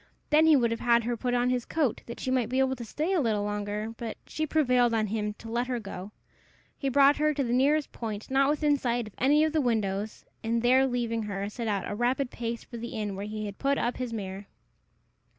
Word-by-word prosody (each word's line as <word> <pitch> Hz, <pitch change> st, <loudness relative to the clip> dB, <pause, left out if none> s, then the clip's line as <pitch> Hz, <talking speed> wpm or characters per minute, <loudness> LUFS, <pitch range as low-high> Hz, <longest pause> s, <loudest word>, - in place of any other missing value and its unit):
Then 310 Hz, +2 st, +6 dB
he 315 Hz, -, +7 dB
would 235 Hz, -4 st, +3 dB
have 230 Hz, -, -2 dB
had 235 Hz, -1 st, +3 dB
her 240 Hz, +1 st, -1 dB
put 245 Hz, +1 st, -1 dB
on 245 Hz, +1 st, +2 dB
his 250 Hz, -1 st, 0 dB
coat, 290 Hz, -6 st, 0 dB
that 235 Hz, -, -7 dB
she 255 Hz, -, -2 dB
might 250 Hz, -4 st, +1 dB
be 255 Hz, -, -1 dB
able 265 Hz, 0 st, +2 dB
to 240 Hz, -, -7 dB
stay 310 Hz, -, -2 dB
a 355 Hz, -, +3 dB
little 215 Hz, -5 st, +1 dB
longer; 210 Hz, +1 st, -3 dB
but 230 Hz, -2 st, -5 dB
she 310 Hz, 0 st, -3 dB
prevailed 250 Hz, -6 st, +3 dB
on 220 Hz, -1 st, +2 dB
him 210 Hz, 0 st, -2 dB
to 225 Hz, -, -12 dB
let 240 Hz, +2 st, -1 dB
her 250 Hz, -2 st, -1 dB
go. 195 Hz, -2 st, -8 dB, 0.6 s
He 275 Hz, -, -2 dB
brought 280 Hz, +2 st, +5 dB
her 305 Hz, 0 st, +2 dB
to 280 Hz, -, 0 dB
the 240 Hz, -1 st, -1 dB
nearest 285 Hz, +4 st, +2 dB
point 220 Hz, 0 st, -6 dB
not 270 Hz, +1 st, +4 dB
within 295 Hz, -1 st, +2 dB
sight 240 Hz, -3 st, -1 dB
of 210 Hz, -, -11 dB
any 290 Hz, +4 st, +4 dB
of 315 Hz, 0 st, +1 dB
the 315 Hz, -, +2 dB
windows, 215 Hz, -4 st, -1 dB, 0.2 s
and, 230 Hz, +1 st, 0 dB
there 260 Hz, +2 st, +5 dB
leaving 235 Hz, -2 st, -1 dB
her, 200 Hz, -2 st, -3 dB
set 230 Hz, +2 st, -5 dB
out 200 Hz, -2 st, -1 dB
at -, -, -5 dB
a -, -, -3 dB
rapid 245 Hz, +3 st, 0 dB
pace 235 Hz, 0 st, -4 dB
for 235 Hz, -, -9 dB
the 235 Hz, +1 st, -6 dB
inn 205 Hz, -2 st, -3 dB
where 200 Hz, +2 st, -5 dB
he 215 Hz, 0 st, -4 dB
had 200 Hz, -1 st, -7 dB
put 280 Hz, 0 st, +1 dB
up 240 Hz, -, -1 dB
his 250 Hz, -2 st, -3 dB
mare. 195 Hz, -2 st, -5 dB
240 Hz, 250 wpm, -28 LUFS, 215-265 Hz, 0.6 s, he